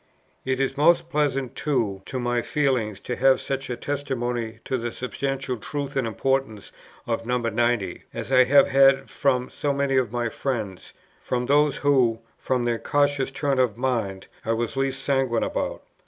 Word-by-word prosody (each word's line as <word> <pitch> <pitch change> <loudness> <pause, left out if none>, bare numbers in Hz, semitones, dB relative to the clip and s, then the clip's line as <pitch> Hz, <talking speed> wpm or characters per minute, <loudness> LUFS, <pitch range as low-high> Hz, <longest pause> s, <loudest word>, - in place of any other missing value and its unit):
It 130 0 0
is 135 0 -1
most 170 +3 +3
pleasant 135 -4 0
too 115 -10 -1
to 130 - -4
my 120 0 0
feelings, 125 -9 0
to 125 - -4
have 135 +1 +4
such 135 -1 -4
a 125 - -2
testimony 120 -5 -3
to 130 - -1
the 120 0 -3
substantial 135 +1 -3
truth 140 +5 -5
and 130 -4 0
importance 115 -1 -1 0.3
of 115 -1 -2
No. 125 +2 0
90, 115 -4 -1
as - - -6
I 130 -1 +6
have 140 +1 +6
had 135 0 +4
from 125 -2 0
so 145 - -1
many 140 -1 +1
of 125 -4 +1
my 120 -1 -1
friends, 110 -7 -4 0.3
from 125 0 -2
those 145 +2 +3
who, 130 -6 +3 0.2
from 125 -2 -1
their 120 -1 0
cautious 145 +2 +1
turn 135 0 -1
of 125 -4 +2
mind, 115 -7 -1 0.2
I 115 - 0
was 115 +2 -2
least 135 0 -1
sanguine 135 -4 +1
about. - - -3
130 Hz, 170 wpm, -24 LUFS, 120-135 Hz, 0.3 s, I